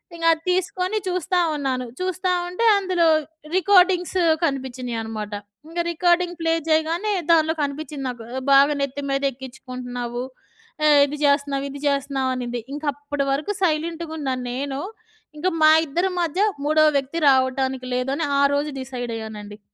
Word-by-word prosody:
ఇంక 330 0 -4
అది 320 - -7
తీసుకొని 370 +2 -1
చూస్తా 365 0 -1 0.2
ఉన్నాను. 260 -3 -2
చూస్తా 370 0 -1 0.2
ఉంటే 365 +6 -1
అందులో 370 -3 +1 0.5
రికోర్డింగ్స్ 370 -1 +4 0.2
కనిపిచ్చినియి 255 -5 -2
అనమాట. 215 -1 -5 0.4
ఇంగ 340 +1 -2
రికార్డింగ్ 350 +1 +1
ప్లే 325 0 +2
చేయగానే, 325 +6 +1 0.2
దానిలో 320 -1 +4
కనిపిచ్చింది 285 -1 -4
నాకు. 240 -2 -7
ఆహ్, 260 - -3
"బాగా 280 +2 +6
నెత్తి 275 +1 -2
మీదెక్కించుకుంటున్నావు. 250 -2 -4 0.6
ఆహ్, 295 -1 +6
ఇది 295 +1 -5
చేస్తున్నావు, 280 -1 +1
ఇది 285 - -8
చేస్తున్నావు" 275 -1 0
అనింది. 240 -1 -4
ఇంకప్పటి 290 -1 -3
వరకు 300 +9 -1
సైలెంట్‌గున్న 320 -2 -1 0.2
నేను, 270 +2 -3 0.6
ఇంక 370 - 0 0.2
మా 310 - +8 0.2
ఇద్దరి 350 +6 0
మధ్య 340 +4 -1 0.2
మూడో 310 +1 +4
వ్యక్తి 275 +4 -3
రావటానికి 260 0 +1
లేదని, 270 +5 -1 0.2
ఆ - - +5
రోజు 295 +1 -1
డిసైడ్ 245 -2 -5
అయ్యానండి. 210 -1 -8
285 Hz, 135 wpm, -22 LUFS, 260-335 Hz, 0.6 s, మా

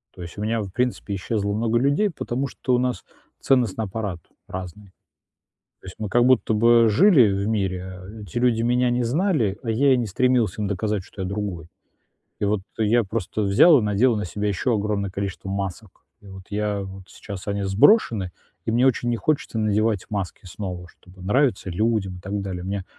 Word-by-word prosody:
То 90 - -10
есть 85 +3 -9
у - - -5
меня 110 +1 0
в 100 - -6
принципе 125 -2 -2
исчезло 100 +1 -2
много 115 +2 +1
людей, 140 - +2
потому 140 -5 -3
что 130 -1 -2
у - - +2
нас 125 -6 -2 0.3
ценностный 115 -5 +1
аппарат 100 -3 -4 0.3
разный. 95 +2 -8 0.9
То - - -15
есть 90 - -9
мы 110 - -3
как 120 +4 +3
будто 125 -3 +3
бы 115 +1 +5
жили 125 - +5
в 100 +2 -1
мире, 95 -3 -2 0.2
эти 100 +1 -5
люди 120 -2 +2
меня 125 +1 +2
не 120 0 0
знали, 125 - 0
а 115 - -1
я 135 +5 +3
и - - +3
не 120 -2 -1
стремился 110 -1 +1
им 100 - -1
доказать, 105 +1 -1
что 95 - -8
я 95 - -3
другой. 100 -5 -4 0.7
И - - 0
вот 100 -1 0 0.2
я 115 +2 +3
просто 110 0 -3
взял 105 - +6
и - - -1
надел 105 +4 +2
на 105 -2 -2
себя 105 +4 -3
ещё 105 +5 0
огромное 100 -1 -1
количество 95 0 -5
масок. 100 0 -5 0.2
И 100 - -16
вот 95 -1 -10
я, 105 -1 -1
вот 95 -1 -9
сейчас 100 -2 -9
они 100 0 -1
сброшены, 105 - +3 0.3
и - - -1
мне 120 +3 +3
очень 120 -2 +2
не 120 - 0
хочется 140 +1 -1
надевать 110 -1 +1
маски 100 -3 -4
снова, 90 -1 -6
чтобы 90 +2 -18
нравиться 105 0 +1
людям 95 0 -1
и - - -11
так 100 +3 -4
далее. 95 -2 -5
Мне 95 0 -4
105 Hz, 195 wpm, -23 LUFS, 95-120 Hz, 0.9 s, взял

